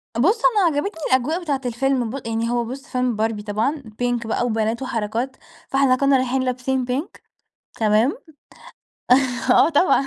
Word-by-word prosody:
بُص، 385 Hz, -, +2 dB
أنا 415 Hz, -7 st, +4 dB
عجبتني 325 Hz, +1 st, -3 dB
الأجواء 285 Hz, +8 st, +1 dB
بتاعة 285 Hz, -5 st, -2 dB
الفيلم 245 Hz, 0 st, 0 dB
ب 260 Hz, 0 st, -6 dB
يعني 225 Hz, 0 st, -1 dB
هو 240 Hz, 0 st, 0 dB
بُص 270 Hz, +5 st, -8 dB
فيلم 250 Hz, -4 st, -1 dB
باربي 215 Hz, -1 st, -1 dB
طبعًا 220 Hz, +9 st, -1 dB, 0.2 s
pink 240 Hz, -1 st, -1 dB
بقى 225 Hz, -, 0 dB
وبنات 225 Hz, 0 st, -1 dB
وحركات، 235 Hz, +1 st, -3 dB, 0.3 s
فإحنا 270 Hz, -1 st, +3 dB
كُنّا 275 Hz, +1 st, +3 dB
رايحين 260 Hz, 0 st, 0 dB
لابسين 255 Hz, 0 st, -1 dB
pink 255 Hz, +7 st, -4 dB, 0.6 s
تمام؟ 220 Hz, -, +2 dB, 1.3 s
آه 250 Hz, -, +6 dB
طبعًا. 290 Hz, -3 st, +3 dB
255 Hz, 150 wpm, -21 LUFS, 230-275 Hz, 1.3 s, آه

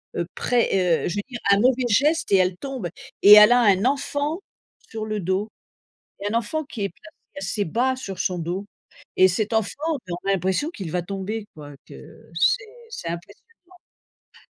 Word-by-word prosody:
heu, 170 Hz, -, -1 dB
près, 190 Hz, -8 st, +1 dB
heu -, -, 0 dB
je 175 Hz, -, -4 dB
veux -, -, 0 dB
dire 240 Hz, -2 st, -6 dB
un 200 Hz, -, +6 dB
mauvais 250 Hz, +1 st, +2 dB
geste 295 Hz, +6 st, +2 dB
et 195 Hz, -, +6 dB
elle 185 Hz, -1 st, +1 dB
tombe 265 Hz, -8 st, -5 dB, 0.3 s
et 205 Hz, +1 st, +9 dB
elle 210 Hz, +2 st, +9 dB
a 245 Hz, -, +6 dB
un 200 Hz, 0 st, +3 dB
enfant 285 Hz, +4 st, -1 dB, 0.5 s
sur 220 Hz, -1 st, -5 dB
le 215 Hz, -1 st, -3 dB
dos 190 Hz, +4 st, -2 dB, 0.7 s
et 205 Hz, +1 st, -2 dB
un 230 Hz, -, +2 dB
enfant 310 Hz, +8 st, -2 dB
qui 255 Hz, -8 st, -6 dB
est 200 Hz, -, -1 dB
placé 195 Hz, +5 st, -19 dB, 0.3 s
assez 195 Hz, +1 st, -2 dB
bas 250 Hz, +9 st, 0 dB
sur 195 Hz, -7 st, -7 dB
son 180 Hz, -1 st, -1 dB
do 180 Hz, +5 st, -4 dB, 0.5 s
et 185 Hz, -, +7 dB
cet 210 Hz, +5 st, -1 dB
enfant, 220 Hz, -2 st, +1 dB, 0.4 s
on 175 Hz, -, -2 dB
a -, -, +4 dB
l'impression 190 Hz, -, 0 dB
qu'il 195 Hz, -, -7 dB
va 180 Hz, +1 st, -1 dB
tomber 200 Hz, +4 st, -5 dB
quoi, 145 Hz, -2 st, -11 dB
que -, -, -14 dB
c'est 475 Hz, 0 st, +3 dB, 0.3 s
c'est 170 Hz, -, -6 dB
impressionnant. 170 Hz, +4 st, -8 dB, 0.9 s
Ouais. -, -, -22 dB
205 Hz, 190 wpm, -23 LUFS, 185-250 Hz, 0.9 s, et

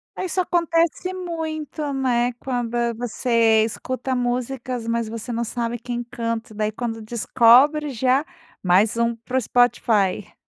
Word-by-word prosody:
Isso 370 Hz, 0 st, -3 dB
acontece 340 Hz, 0 st, +1 dB
muito, 315 Hz, -5 st, -4 dB
né, 250 Hz, -2 st, +1 dB
quando 240 Hz, -1 st, -3 dB, 0.2 s
você 230 Hz, -1 st, +2 dB
escuta 255 Hz, +3 st, -3 dB
músicas 245 Hz, 0 st, -2 dB
mas 230 Hz, -1 st, -1 dB
você 230 Hz, +1 st, -6 dB
não 235 Hz, 0 st, -1 dB
sabe 235 Hz, +1 st, -3 dB
quem 240 Hz, +1 st, -4 dB
canta 230 Hz, -2 st, -4 dB
daí 215 Hz, 0 st, -1 dB
quando 225 Hz, 0 st, -4 dB
descobre 240 Hz, +6 st, +4 dB
já, 260 Hz, +2 st, +1 dB, 0.4 s
mais 195 Hz, +5 st, +3 dB
um 235 Hz, 0 st, +1 dB
para 235 Hz, +3 st, -4 dB
o -, -, +2 dB
Spotify. 220 Hz, -5 st, +1 dB
240 Hz, 130 wpm, -22 LUFS, 230-270 Hz, 0.4 s, descobre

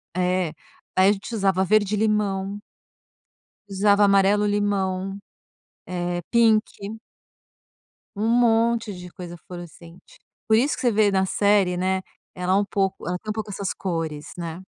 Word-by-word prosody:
É. 180 Hz, -2 st, 0 dB, 0.4 s
Aí 190 Hz, +1 st, +5 dB
a -, -, +6 dB
gente 205 Hz, +3 st, -5 dB
usava 195 Hz, -3 st, +2 dB
verde-limão 205 Hz, -1 st, +1 dB, 1.1 s
usava 200 Hz, +1 st, +3 dB
amarelo-limão, 200 Hz, -1 st, +1 dB, 0.7 s
eh, 175 Hz, -1 st, -3 dB
pink. 220 Hz, -2 st, +1 dB, 1.2 s
Um 210 Hz, +2 st, -1 dB
monte 230 Hz, -2 st, +2 dB
de 180 Hz, -1 st, -9 dB
coisa 175 Hz, -1 st, -9 dB
fluorescente. 175 Hz, 0 st, -12 dB, 0.3 s
Por 220 Hz, -, +5 dB
isso 260 Hz, +7 st, +2 dB
que -, -, -8 dB
você 245 Hz, -, +3 dB
vê 215 Hz, -1 st, +3 dB
na 190 Hz, -1 st, +2 dB
série, 200 Hz, -2 st, +2 dB
né, 190 Hz, +1 st, 0 dB, 0.3 s
ela 180 Hz, +1 st, 0 dB
é -, -, +4 dB
um 200 Hz, +1 st, +2 dB
pouco 195 Hz, -3 st, -2 dB
ela 180 Hz, 0 st, -1 dB
tem 215 Hz, -, -10 dB
um -, -, -2 dB
pouco 215 Hz, -1 st, -5 dB
essas 200 Hz, -1 st, -3 dB
cores, 165 Hz, -5 st, -4 dB
né. 170 Hz, +1 st, -6 dB
195 Hz, 140 wpm, -23 LUFS, 180-210 Hz, 1.2 s, a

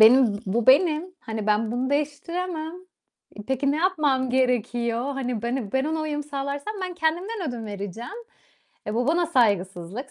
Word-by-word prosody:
benim 225 Hz, -1 st, +7 dB
bu 215 Hz, +4 st, 0 dB
benim. 305 Hz, +3 st, +5 dB, 0.2 s
Hani 220 Hz, -2 st, -4 dB
ben 215 Hz, +1 st, +2 dB
bunu 255 Hz, +2 st, -1 dB
değiştiremem. 315 Hz, +3 st, -2 dB, 0.6 s
E, 210 Hz, -, -6 dB
peki 265 Hz, +1 st, +1 dB
ne -, -, 0 dB
yapmam 300 Hz, -7 st, +2 dB
gerekiyor? 245 Hz, -2 st, +1 dB
Hani 255 Hz, -4 st, -2 dB
ben, 235 Hz, +2 st, 0 dB
ı 220 Hz, -7 st, -5 dB
ben 265 Hz, 0 st, +2 dB
ona 315 Hz, +1 st, -1 dB
uyum 300 Hz, -1 st, -2 dB
sağlarsam 285 Hz, +5 st, -4 dB
ben 365 Hz, -1 st, -3 dB
kendimden 355 Hz, +3 st, -1 dB
ödün 235 Hz, -3 st, -5 dB
vereceğim. 205 Hz, +2 st, -6 dB, 0.8 s
E, 210 Hz, -, -2 dB
bu 240 Hz, +2 st, +1 dB
bana 340 Hz, +3 st, +3 dB
saygısızlık, 205 Hz, -, +1 dB
265 Hz, 160 wpm, -25 LUFS, 230-310 Hz, 0.8 s, benim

